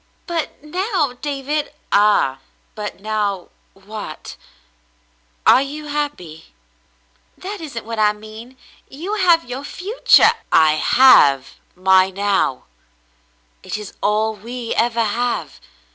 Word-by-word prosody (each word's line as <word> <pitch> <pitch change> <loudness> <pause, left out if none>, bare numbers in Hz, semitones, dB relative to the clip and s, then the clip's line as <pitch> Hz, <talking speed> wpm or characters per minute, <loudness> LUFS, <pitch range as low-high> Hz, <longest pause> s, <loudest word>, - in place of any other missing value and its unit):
"Butnow, 330 - -3
David— 290 +1 -3
" - - -41
"Ah, 200 -10 +3 0.3
but 210 -2 -7
now 205 -3 -2
— - - -41
what? 195 -4 -9 1.1
Are - - +6
you 295 +2 -6
happy? 230 - -5 0.4
" - - -40
"That 405 -2 -6
isn't 270 -9 -7
what 230 -1 -5
I 210 -1 +4
mean. 215 +4 -12 0.3
You 340 +10 -6
have 350 -7 +3
your 255 +3 -6
future 395 +10 +3
— - - -23
" - - -41 0.2
"I - - +4
have 145 - +5 0.2
my 190 +1 +4
now. 195 -8 0 1.0
It - - -5
is 210 -2 -9
all 215 +1 +1
we 235 +3 -6
ever 230 0 +1
have. 235 +3 -2
230 Hz, 125 wpm, -19 LUFS, 205-290 Hz, 1.1 s, Are